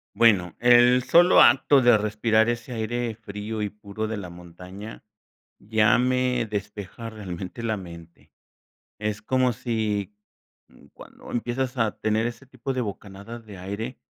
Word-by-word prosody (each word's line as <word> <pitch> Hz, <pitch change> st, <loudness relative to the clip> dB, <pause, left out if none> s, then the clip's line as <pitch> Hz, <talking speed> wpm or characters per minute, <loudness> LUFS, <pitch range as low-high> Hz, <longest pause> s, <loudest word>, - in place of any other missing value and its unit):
Bueno, 100 Hz, -6 st, +3 dB
el 120 Hz, +1 st, +5 dB
solo 170 Hz, +8 st, +6 dB
acto 135 Hz, 0 st, +5 dB
de 120 Hz, -3 st, +6 dB
respirar 110 Hz, +2 st, +1 dB
ese 120 Hz, +1 st, -4 dB
aire 115 Hz, 0 st, -3 dB
frío 105 Hz, 0 st, -6 dB
y 105 Hz, -, -1 dB
puro 105 Hz, +1 st, -6 dB
de 110 Hz, -1 st, -4 dB
la 90 Hz, -3 st, -7 dB
montaña, 90 Hz, +5 st, -11 dB, 0.6 s
ya 110 Hz, +3 st, +3 dB
me 125 Hz, -1 st, +1 dB
despeja 105 Hz, +1 st, -6 dB
realmente 95 Hz, 0 st, -7 dB
la 110 Hz, -2 st, 0 dB
mente, 85 Hz, -2 st, -12 dB, 0.7 s
es 105 Hz, 0 st, -3 dB
como 130 Hz, -2 st, +1 dB
si, 105 Hz, -3 st, -2 dB, 0.5 s
mm, -, -, -21 dB
cuando -, -, -13 dB
empiezas 125 Hz, +2 st, -2 dB
a 115 Hz, -2 st, 0 dB
tener 110 Hz, +2 st, +1 dB
ese 120 Hz, +3 st, -8 dB
tipo 130 Hz, +1 st, -5 dB
de 130 Hz, -, -1 dB
bocanadas 100 Hz, +2 st, -8 dB
de 100 Hz, -3 st, -11 dB
aire 100 Hz, +7 st, -6 dB
110 Hz, 145 wpm, -25 LUFS, 100-120 Hz, 0.7 s, solo